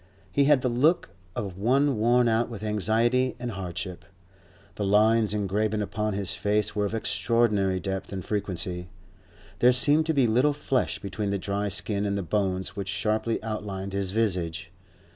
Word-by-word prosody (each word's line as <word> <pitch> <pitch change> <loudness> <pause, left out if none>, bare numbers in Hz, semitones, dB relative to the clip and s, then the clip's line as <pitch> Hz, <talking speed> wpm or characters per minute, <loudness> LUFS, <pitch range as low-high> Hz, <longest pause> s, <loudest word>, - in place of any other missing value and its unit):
He 140 +9 +3
had 145 -2 +5
the 125 - 0
look 140 +8 +2 0.2
of 100 -5 -5
one 135 +6 +2
worn 120 +3 +3
out 115 +1 +1
with 115 -2 -7
anxiety 115 +5 +1
and 120 0 -4
hardship; 90 -2 -5 0.7
the 105 - -4
lines 105 +2 +3
engraven 105 +1 0
upon 105 +1 -2
his 100 -2 -1
face 105 +4 0
were 105 -1 +1
of 100 - -2
extraordinary 105 -5 +1
depth 95 +1 -4
and 95 -3 -5
frequency; 90 -3 -3 0.7
there 125 - +6
seemed 145 +5 +3
to 160 - +2
be 135 -3 +4
little 125 +6 +3
flesh 135 -3 -1
between 100 +1 -4
the 100 - 0
dry 100 +2 -2
skin 100 +1 0
and 100 0 -1
the 100 - -2
bones 95 0 -1
which 100 -2 -4
sharply 110 +4 -1
outlined 100 -3 -4
his 100 -1 -2
visage. 90 -5 -1
105 Hz, 165 wpm, -26 LUFS, 95-115 Hz, 0.7 s, there